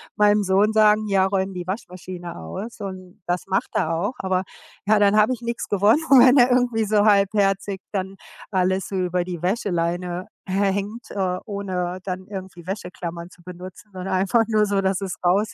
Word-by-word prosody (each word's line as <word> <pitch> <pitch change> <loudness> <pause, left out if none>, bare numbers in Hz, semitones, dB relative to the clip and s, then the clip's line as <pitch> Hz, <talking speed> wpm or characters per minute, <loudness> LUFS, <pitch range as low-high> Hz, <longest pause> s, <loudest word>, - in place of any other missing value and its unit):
meinem 210 0 +4
Sohn 195 +2 +3
sagen: 215 0 +4
„Ja, 195 -2 +3
räum 190 0 -1
die 180 -1 -5
Waschmaschine 180 -3 -6
aus“, 195 - -7
und 185 -1 -8
das 175 +1 -2
macht 195 0 0
er 165 -4 0
auch. 200 +9 -1
Aber 185 -1 0 0.4
ja, 210 +1 +4
dann 205 0 +4
habe 215 +4 +4
ich 240 - -8
nix 235 0 -4
gewonnen, 210 +9 +3
wenn 255 0 +8
er 250 0 +6
irgendwie 245 -3 +2
so 210 0 +3
halbherzig 200 -1 +2
dann 195 -1 -3 0.3
alles 185 0 +1
so 195 - -5
über 180 -1 0
die 175 -2 -6
Wäscheleine 180 -2 -1 0.2
hä 195 +1 +1
hängt, 205 +4 -5
äh, 185 -2 -1
ohne 185 -3 -3
dann 185 0 -5
irgendwie 190 -4 -8
Wäscheklammern 175 -3 -6
zu 180 -1 -20
benutzen, 180 +3 -11
sondern 185 +1 -5
einfach 195 +5 +3
nur 215 -1 +3
so, 200 -1 0
dass 190 -1 0
es 190 -2 -3
raus 200 +4 +2
195 Hz, 180 wpm, -23 LUFS, 180-210 Hz, 0.4 s, wenn